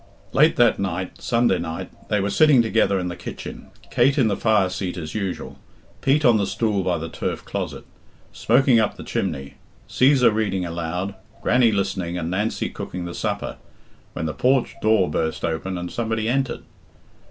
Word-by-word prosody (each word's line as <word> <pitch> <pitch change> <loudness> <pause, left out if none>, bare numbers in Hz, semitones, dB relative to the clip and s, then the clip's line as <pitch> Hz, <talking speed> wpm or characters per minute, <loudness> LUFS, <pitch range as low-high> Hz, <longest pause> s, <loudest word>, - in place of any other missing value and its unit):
Late 155 +3 +4
that 120 -2 +4
night 95 -1 -3
Sunday 115 -6 +2
night 80 0 -5 0.2
they 105 - +2
were 100 +1 -1
sitting 145 -4 +5
together 110 -3 +2
in 90 -1 -2
the 85 - -4
kitchen, - - -8 0.2
Kate 135 +4 +3
in 125 -6 +4
the 100 - +1
fire 105 -2 +3
seat 90 0 -4
as 80 -3 -6
usual, 100 -4 -4 0.4
Pete 145 +3 +2
on 120 -3 +6
the 100 - 0
stool 105 0 0
by 90 -2 0
the 80 +1 -5
turf - - -4
closet, - - -5 0.5
smoking 125 0 +4
up 110 - 0
the - - -8
chimney, 70 +1 -3 0.3
Cæsar 130 -3 +4
reading 100 -4 -1
aloud, 85 +3 -3 0.3
Grannie 120 -1 +4
listening, 95 -4 -1
and 85 -1 -3
Nancy 105 +4 -1
cooking 90 -1 -6
the 85 - -6
supper, - - -3 0.6
when 80 - -3
the 80 - -2
porch 130 +4 +2
door 110 -4 +3
burst 80 +1 -2
open 85 +3 -2
and 90 0 -5
somebody 115 -1 -2
entered. 130 +2 -1
100 Hz, 175 wpm, -23 LUFS, 90-115 Hz, 0.6 s, on